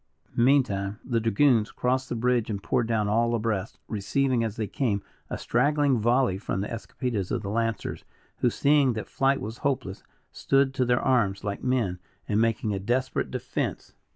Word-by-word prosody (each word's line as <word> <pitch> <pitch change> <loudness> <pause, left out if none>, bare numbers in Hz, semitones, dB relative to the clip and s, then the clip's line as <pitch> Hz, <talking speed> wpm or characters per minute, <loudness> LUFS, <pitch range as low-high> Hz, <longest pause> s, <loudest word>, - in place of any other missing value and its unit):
Meantime, 110 -6 +2
the 120 -3 +1
dragoons 115 0 +3
crossed 130 +1 -1
the - - -2
bridge 120 -1 +1
and 100 -2 -3
poured 120 - +1
down 110 -3 +1
all 115 +3 +2
abreast, 110 -3 -2
receiving 120 +4 0
as 110 -2 -3
they 110 -3 -2
came, 100 -3 -1 0.3
a - - -3
straggling 140 +1 +2
volley 120 -3 +2
from 95 - -2
the 100 - -2
escopetas 115 -3 -3
of - - -2
the 100 - -3
lancers, 115 -1 -2 0.3
who 125 - +2
seeing 140 0 +3
that 110 -1 -4
flight 135 +1 +1
was 110 +3 -6
hopeless, 125 -9 -2 0.3
stood 135 -1 +2
to 130 -1 +1
their 120 0 +2
arms 115 -8 +1
like 100 -1 -4
men, 115 -9 0 0.3
and 105 +1 +2
making 115 -2 0
a 100 - -2
desperate 125 +6 -1
defense. - - -4
115 Hz, 175 wpm, -26 LUFS, 105-130 Hz, 0.3 s, dragoons